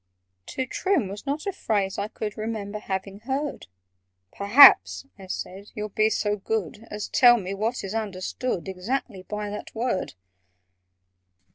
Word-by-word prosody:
"To 260 - -3
trim" 330 - 0
was 205 +7 -8
not 290 +2 -2
a 400 - 0
phrase 200 - -1
I 200 - -1
could 215 -1 -5
Remember 215 -2 -4
having 195 0 -4
heard: 270 +5 -3 0.7
"Perhaps," 225 +7 +7
I 190 - -11
said, 190 +2 -6
"you'll 210 0 -4
be 215 +2 +2
so 210 -1 0
good 215 +1 -3
As 210 0 -5
tell 240 -2 +6
me 195 -3 -4
what 220 +5 -2
is 195 +1 -5
understood 205 0 -3
Exactly 195 +2 -3
by 210 +2 -5
that 210 - -8
word?" 230 - -2
210 Hz, 145 wpm, -25 LUFS, 195-240 Hz, 0.7 s, Perhaps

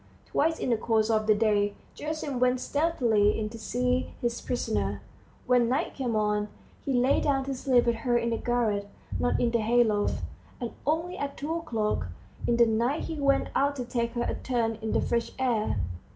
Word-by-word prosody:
Twice 320 +2 +1
in 250 - -1
the 230 - +3
course 220 0 +1
of 215 -1 +1
the 215 - +5
day 205 -1 +2 0.2
Gerasim 300 -4 -3
went 250 0 +3
stealthily 245 -9 +2
in 215 -1 -2
to 230 +1 -9
see 250 +3 -1
his 235 -1 -2
prisoner; 100 - -1 0.5
when 245 -2 +3
night 260 +4 0
came 245 -4 -2
on, 210 -1 +1 0.4
he 275 - -2
lay 255 +1 +3
down 270 -2 +1
to 275 - -2
sleep 255 -2 +2
with 235 -1 +1
her 240 +1 +1
in 235 0 0
the 230 - 0
garret, 220 -5 0 0.3
not 245 - +1
in 235 - +2
the 235 - +2
hay 240 +3 +4
loft, 210 -2 0 0.4
and 240 -3 -4 0.2
only 335 +4 0
at 280 0 -4
two 305 +3 -3
o'clock 225 - -1 0.4
in 235 - +2
the 235 - +7
night 235 +7 +1
he 320 -2 -4
went 275 -1 +2
out 285 +1 +2
to 250 -3 -4
take 235 -1 -2
her 240 -1 -1
a - - -1
turn 230 -3 -1
in 220 - -2
the - - +2
fresh 235 -1 -1
air. 235 - 0
240 Hz, 200 wpm, -28 LUFS, 220-265 Hz, 0.5 s, the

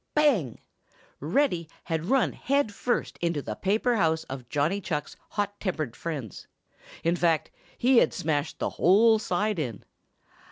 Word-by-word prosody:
Bang! 245 - +3 0.6
Reddy 170 - 0
had 165 -1 -2
run 265 +6 +2
head 280 -5 0
first 245 +4 -2
into 170 -3 0
the 110 - -4
paper 220 - +1
house 160 -4 +2
of 130 -2 -8
Johnny 155 +9 0
Chuck's 150 -6 -3
hot 205 -1 -3
tempered 155 - -3
friends. 140 - -6 0.6
In 170 +1 +2
fact 165 -3 +1 0.3
he 255 +1 +4
had 160 - +5
smashed 150 -1 -2
the - - -2
whole 220 +5 +5
side 210 -1 -1
in. 120 -9 -4
170 Hz, 145 wpm, -27 LUFS, 155-215 Hz, 0.6 s, had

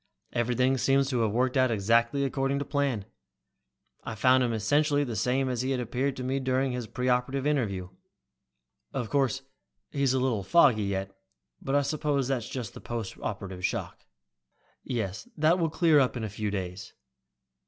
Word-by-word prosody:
Everything 125 +2 +1
seems 135 +1 +2
to 125 - 0
have 110 -2 +2
worked 125 +4 +1
out 130 -1 +4
exactly 115 +5 +2
according 135 +1 0
to 140 - -2
plan. 135 -8 -1 1.0
I 110 - -5
found 130 +4 +4
him 120 -2 +1
essentially 145 +7 +2
the 120 -5 -4
same 125 +5 +1
as 125 -2 -1
he 130 +1 0
appeared 130 +2 -1
to 130 - -4
me 130 +2 -1
during 130 0 0
his 125 -2 -4
pre 125 +1 -3
operative 130 +2 +1
interview. 105 -11 0 1.0
Of 120 -4 -3
course 135 -2 +1 0.5
he's 140 -2 +1
a - - +2
little 125 -5 0
foggy 110 - +4
yet, 95 0 -3 0.5
but 135 - -1
I 145 - +4
suppose 145 -2 0
that's 125 -4 -1
just 125 -4 -5
the - - -10
post 115 -4 -4
operative 95 -2 -5
shock." - - -3 0.8
"Yes, 110 - -4
that 160 +4 +3
will 165 -2 +1
clear 160 -2 +4
up 130 -2 +1
in 115 - -4
a 110 - -3
few 105 +1 -3
days." 95 -2 -5
125 Hz, 175 wpm, -28 LUFS, 110-135 Hz, 1.0 s, out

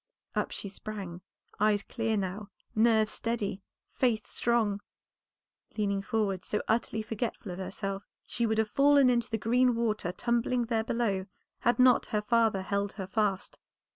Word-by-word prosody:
Up - - 0
she - - -5
sprung, 195 -3 -7 0.4
eyes 210 -1 +3
clear 225 -2 -1
now, 195 +1 -3 0.2
nerves 220 -1 +3
steady, 220 -4 -2 0.3
faith 235 -4 +1
strong. 220 -4 0 1.0
Leaning 200 -2 0
forward 195 -3 -1
so 210 - -1
utterly 220 -1 0
forgetful 220 -2 -4
of 180 - -6
herself, 195 +1 -4 0.2
she 235 -1 -1
would 220 0 0
have 220 -1 +2
fallen 280 +1 +5
into 235 -1 0
the 225 - 0
green 245 +3 +3
water 215 -6 0
tumbling 240 +4 0
there 225 -1 0
below, 210 -5 -1 0.3
had 240 - +2
not 250 -1 +5
her 210 -3 0
father 225 -3 +2
held 200 0 -1
her 195 - -5
fast. 195 0 -1
215 Hz, 150 wpm, -30 LUFS, 200-235 Hz, 1.0 s, fallen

